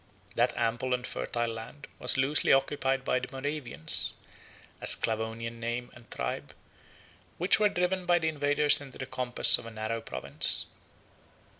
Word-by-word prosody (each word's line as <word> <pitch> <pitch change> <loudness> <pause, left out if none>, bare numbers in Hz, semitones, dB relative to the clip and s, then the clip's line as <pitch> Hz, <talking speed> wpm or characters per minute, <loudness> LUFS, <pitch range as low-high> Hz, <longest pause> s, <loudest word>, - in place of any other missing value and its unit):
30 - - -20
That - - 0
ample 120 +3 -1
and 125 0 -7
fertile 120 -1 -3
land 125 +5 -10
was - - +4
loosely 135 +3 +2
occupied 135 -1 0
by 125 - 0
the 125 - -7
Moravians, 135 - 0 0.7
a - - +4
Sclavonian 115 +1 +4
name 120 +1 -5
and 120 -1 -18
tribe, 65 0 -5 0.8
which 180 +5 +3
were 210 -1 +3
driven 180 -1 -2
by 175 0 +4
the 160 -2 -2
invaders 145 0 +2
into 135 -2 -12
the 130 - -6
compass 125 -1 +1
of 115 - -11
a - - -7
narrow 110 +1 -5
province. 65 -12 -2
130 Hz, 155 wpm, -28 LUFS, 115-145 Hz, 0.8 s, was